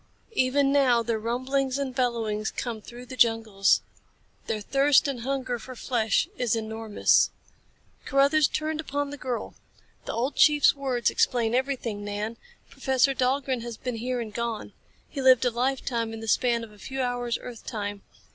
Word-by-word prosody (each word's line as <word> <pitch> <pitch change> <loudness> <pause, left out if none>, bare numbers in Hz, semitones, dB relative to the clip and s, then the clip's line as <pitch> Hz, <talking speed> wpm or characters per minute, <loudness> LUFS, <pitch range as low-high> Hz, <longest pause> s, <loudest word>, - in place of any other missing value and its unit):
Even 275 -3 +2
now 255 -4 +4
their 230 -1 -1
rumblings 260 +4 -1
and 275 -2 -3
bellowings 230 -4 -1
come 230 -3 -4
through 240 +3 -11
the 255 - -8
jungles. 225 -5 +3 0.7
Their 215 - -1
thirst 275 +5 +3
and 270 -3 -3
hunger 260 -1 -2
for 255 +3 -9
flesh 230 +2 +1
is 240 -2 +1
enormous." 220 -1 +2 0.8
Carruthers 280 +2 +4
turned 310 0 -2
upon 285 -1 -3
the - - -5
girl. 255 -3 -4 0.5
"The - - -4
old 245 +5 -1
chief's 295 -1 +6
words 265 -4 0
explain 235 -2 +1
everything, 250 -5 -1
Nan. 205 +2 -4 0.3
Professor 265 0 +1
Dahlgren 260 -1 0
has 235 -1 -6
been 250 -3 -4
here 250 +2 -2
and 220 -3 -5
gone. 235 -1 -4 0.3
He 280 - -5
lived 260 -1 +6
a 245 - +2
lifetime 240 -2 -1
in 225 - -6
the 225 - -7
span 235 +1 +2
of 225 - -10
a 210 - -18
few 265 +4 -6
hours 245 -1 -1
earth 240 -3 -9
time. 205 -3 -4
245 Hz, 165 wpm, -26 LUFS, 225-270 Hz, 0.8 s, chief's